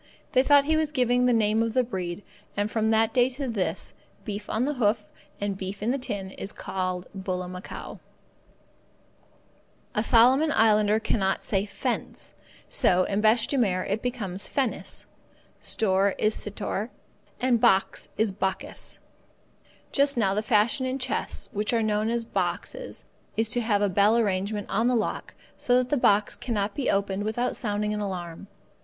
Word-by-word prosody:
They 255 - +5
thought 285 +1 +5
he 315 +2 +2
was 315 -1 +1
giving 250 -3 +2
the - - +4
name 220 -1 +3
of 230 +1 -1
the 255 - +4
breed, 185 -5 -4 0.3
and 205 +1 0
from 220 -1 +1
that 225 0 +3
day 250 -1 +4
to 265 +1 -5
this, 210 -6 -2 0.3
beef 205 -1 -5
on 225 +4 0
the 295 - 0
hoof 220 -4 +1 0.4
and 200 -1 -1
beef 195 +1 -6
in 230 - +1
the 275 - -1
tin 200 -7 -4
is 195 - -5
called 185 -2 -3
bullamacow. 185 -1 -5 1.9
A 210 - +1
Solomon 255 +7 +5
islander 215 -1 +4
cannot 195 -3 0
say 200 0 0
fence, - - -3 0.3
so, 185 0 +3
in 200 +2 -1
bêche 220 +1 +4
de 280 - 0
mer, 185 -6 +1
it 205 +3 -2
becomes 205 -6 -2
fennis; 265 -4 -2 0.5
store 195 -2 +1
is 215 0 +2
sittore, 210 +1 -2 0.5
and 245 -3 +2
box 190 0 +2
is 220 -1 +2
bokkis. 190 0 -3 0.9
Just 280 -1 +2
now 195 -4 +2
the 210 - 0
fashion 220 +4 +2
in 260 +1 -1
chests, 255 -2 -3
which 210 0 -1
are 230 -1 +2
known 215 0 +1
as 235 0 -1
boxes, - - -3 0.3
is 225 0 +2
to 245 - +1
have 210 -3 +1
a - - +4
bell 200 +4 +4
arrangement 205 -1 0
on 225 +4 +1
the 250 - +3
lock 225 - -2 0.2
so 245 0 +3
that 250 0 +1
the 295 - +2
box 210 -5 +3
cannot 205 -4 -2
be 270 +1 -1
opened 200 0 0
without 230 +4 -1
sounding 210 -1 -1
an 210 - -2
alarm. 180 -3 -5
215 Hz, 165 wpm, -26 LUFS, 200-245 Hz, 1.9 s, They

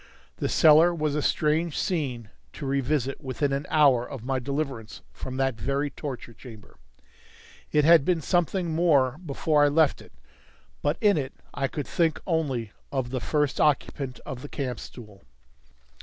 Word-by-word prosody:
The - - -2
cellar 160 +3 +6
was 155 -2 -1
a 150 - 0
strange 155 +2 0
scene 130 - -2 0.2
to - - -7
revisit 135 0 -1
within 135 +1 -1
an 140 +1 -3
hour 140 -6 +4
of 125 -2 -8
my 135 0 0
deliverance 135 -4 -4
from 130 - -7
that 135 -4 0
very 140 +5 -1
torture 130 -4 -7
chamber. 110 -3 -14 0.9
It 150 -1 +3
had 165 -2 +7
been 175 +2 +1
something 175 +1 0
more 150 -5 +2
before 150 -1 +1
I - - +6
left 150 0 +2
it, - - -16 0.7
but 145 +2 0
in 205 -6 +4
it 135 -1 -5 0.2
I 135 - -1
could 145 +2 -5
think 165 -3 0
only 135 - -1 0.2
of 130 -3 -2
the 130 -2 -2
first 145 +6 0
occupant 135 -3 0
of 130 -1 -6
the 145 - -8
camp 130 -4 -4
stool. 105 -5 -12
140 Hz, 160 wpm, -26 LUFS, 130-155 Hz, 0.9 s, had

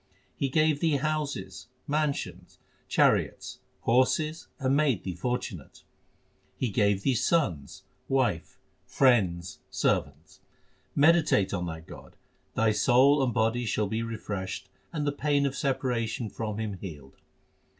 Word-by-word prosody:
He 135 - -1
gave 155 +1 +2
thee 160 -2 +2
houses, 140 -9 -3 0.2
mansions, 150 -1 -2 0.3
chariots, - - +1 0.2
horses, 150 +6 +1
and 135 -1 +1
made 140 -8 +2
thee 95 - -3
fortunate; 95 - -4 0.7
He 125 - -1
gave 100 -1 +1
thee 135 - +2
sons, 100 - 0 0.3
wife, 130 -11 0 0.3
friends, 95 -10 +2
servants. 75 +2 -1 0.6
Meditate 150 - +4
on 90 -2 -2
that 80 -1 -7
God; - - -12 0.4
thy 110 -1 +3
soul 135 +6 +4
and 130 -2 +1
body 115 +2 +1
shall 105 +1 0
be 110 +3 -2
re 115 -1 -4
freshed, 100 -3 -5 0.2
and 150 -3 -2
the 145 - +1
pain 145 0 +1
of 135 -1 -1
separation 125 -5 -1
from 110 -2 -4
Him 105 -4 -4
healed. 75 -8 -9
120 Hz, 130 wpm, -28 LUFS, 95-140 Hz, 0.7 s, Meditate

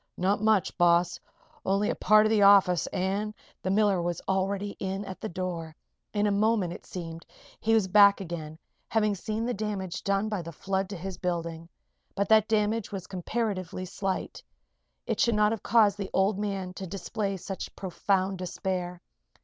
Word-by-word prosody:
"Not 195 +3 +1
much, 215 -3 +2
boss. 175 0 +3 0.4
Only 195 +2 +1
a - - -3
part 215 0 +5
of 215 - +2
the 215 -2 +3
office 195 -3 +6
an' 200 +3 -2
" - - -31
The 185 - -2
miller 200 -2 +3
was 175 -1 -2
already 195 +1 0
in 195 +1 -3
at 190 -1 -8
the 220 - -3
door. 170 -3 -4 0.4
In 205 0 +1
a 205 - +2
moment, 205 -3 +2
it - - -11
seemed, 165 -2 -7 0.4
he 225 0 +2
was 215 -4 +3
back 200 +1 +6
again, 160 -4 -6 0.3
having 215 -2 +2
seen 215 +3 -3
the 245 - -1
damage 195 -4 -4
done 200 +1 +1
by 210 -4 -2
the 170 0 -7
flood 190 +3 -2
to 200 - -5
his 185 +1 -6
building. 170 -2 -3 0.5
But 200 0 0
that 220 -1 +5
damage 215 0 0
was 190 -3 -5
comparatively 185 -1 -3
slight. 190 +1 -3 0.6
It - - -2
should 235 -2 +3
not 210 0 +4
have 225 - -3
caused 210 -3 +4
the 195 - -3
old 195 +1 +2
man 195 -3 -3
to 190 - -5
display 195 +2 -3
such 190 +1 -6
profound 190 0 -1
despair. 180 0 -3
195 Hz, 180 wpm, -28 LUFS, 180-210 Hz, 0.6 s, office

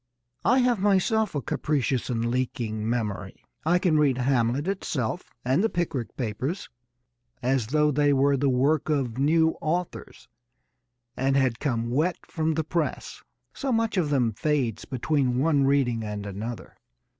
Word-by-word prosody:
I 250 - +4
have 245 -3 +2
myself 205 +1 +2
a 140 - -2
capricious 135 -4 -1
and 115 -2 -1
leaking 115 -3 -2
memory. 105 -5 -3 0.2
I 170 +3 +3
can 175 -4 +2
read 140 -4 +3
Hamlet 130 +3 +1
itself 175 - -2 0.2
and 135 +9 +2
The 225 - +2
Pickwick 150 - -3
Papers 130 - -3 0.7
as 130 -3 +1
though 150 +3 +2
they 145 +1 +3
were 140 0 +3
the 140 +1 +1
work 135 +5 +2
of 130 -5 -1
new 160 +3 +3
authors 175 +3 -3 0.9
and 135 +1 +1
had 130 -4 +1
come 120 -5 -1
wet 160 +8 +1
from 160 -1 -1
the 160 - 0
press, 160 0 -3 0.3
so 270 -1 -3
much 225 -2 +1
of 175 -6 +1
them 125 -6 +1
fades 135 -3 -1
between 130 -1 0
one 140 0 +3
reading 130 -5 +2
and 105 -1 -5
another. 105 +4 -6
140 Hz, 150 wpm, -26 LUFS, 120-160 Hz, 0.9 s, I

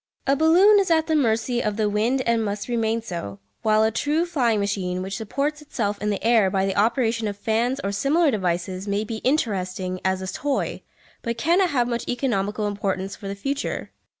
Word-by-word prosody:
A 275 - +3
balloon 360 +8 +6
is 390 - +1
at 320 -1 +3
the 320 - +1
mercy 240 -2 +1
of 210 -1 -2
the 215 -1 +1
wind 225 +6 +1
and 235 -1 +2
must 205 -1 -3
remain 230 -1 0
so, 170 - -6 0.2
while 215 0 +3
a 220 - +2
true 295 +8 0
flying 245 -11 +1
machine, 185 -2 -2
which 195 +1 -4
supports 285 +7 -2
itself 210 -8 -3
in 210 - 0
the 205 - -2
air 225 -4 +4
by 190 0 +1
the 195 0 -1
operation 230 +1 +1
of 200 -1 -4
fans 230 +5 0
or 200 - -1
similar 285 - +2
devices, 185 -1 -2
may 200 +1 0
be 220 +1 -5
interesting 190 -8 -1
as 190 0 +1
a 185 - -4
toy, 285 -1 -2 0.4
but 235 0 -3
cannot 345 +9 +3
have 245 -5 +1
much 235 -1 -3
economical 215 -5 -1
importance 195 -1 -2
for 200 - -9
the 200 - -4
future. 275 +8 -3
220 Hz, 200 wpm, -23 LUFS, 200-265 Hz, 0.4 s, balloon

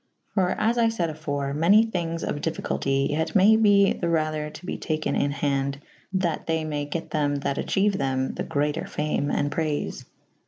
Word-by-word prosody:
For 185 -3 +2
as 230 +3 +1
I 230 - +4
fayd 180 -8 -1
afore 145 -3 -3
^ - - -4
many 195 +8 +5
thyng^j 170 -6 -3
of 145 - -3
difficulty 135 -4 -1
yet 160 +6 -1
may 205 +3 +7
be 205 -2 +5
the 170 - -2
rather 155 -2 0
to 165 - -11
be - - -3
taken 155 -1 -2
in'' 140 - +1
hawde 140 -1 -1 0.2
/ - - -33
that 170 -3 -1
they 160 -1 0
may 150 -2 -2
get 160 +3 -5
them 145 -2 +1
that 140 - -1
acheuethem 135 -10 0
the - - -4
greater 150 +3 -1
fame 150 -1 -1
and 145 0 0
prayfe. 155 -3 -2
155 Hz, 190 wpm, -25 LUFS, 145-185 Hz, 0.2 s, may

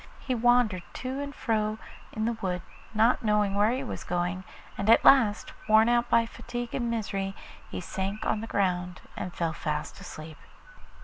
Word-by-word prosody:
He 260 - -2
wandered 240 -5 +3
to 260 +2 -4
and 285 0 -5
fro 215 -2 0 0.3
in 220 0 -2
the 235 - +1
wood, 180 -2 -2 0.3
not 225 +3 +3
knowing 210 -3 +2
where 205 +2 +3
he 260 +2 -2
was 255 - -5
going, 175 +2 -2 0.3
and 200 +2 -2
at 230 - +6
last, 225 -6 +5 0.2
worn 220 +2 +6
out 240 0 +2
by 230 0 +4
fatigue 240 +1 -6
and 240 -2 -1
misery, 195 -4 -2 0.3
he - - -5
sank 195 +4 -4
on 215 - 0
the 225 - -5
ground 180 -3 -1
and 180 - -4
fell 165 -2 -2
fast 150 -1 -4
asleep. 155 0 -9
215 Hz, 175 wpm, -28 LUFS, 185-235 Hz, 0.3 s, at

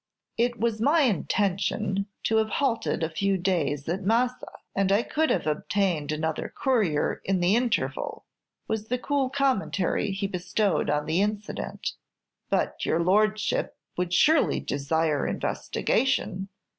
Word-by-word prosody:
"It 240 +1 0
was 225 -1 0
my 300 +6 +4
intention 200 - 0 0.2
to 220 - +2
have 220 0 +2
halted 230 -10 0
a - - +2
few 195 +4 +1
days 165 -6 0
at 175 +4 -1
Massa, 235 +5 +1 0.3
and 195 -1 +2
I 205 +4 +4
could 315 +4 0
have 180 - +1
obtained 155 0 0
another 155 +1 -2
courier 215 - +1
in 190 -1 +1
the 175 +4 +3
interval," 240 -1 -1 0.4
was 220 -1 -2
the 250 - 0
cool 275 +1 0
commentary 255 -8 0
he 195 +1 -2
bestowed 190 -1 0
on 150 0 +1
the 160 +4 +1
incident. 210 0 -3 0.6
"But - - 0
your 165 - +1
Lordship 215 - +1 0.2
would 180 -1 -2
surely 300 - +4
desire 150 +1 0
investigation. 195 -7 -1
200 Hz, 135 wpm, -26 LUFS, 175-230 Hz, 0.6 s, my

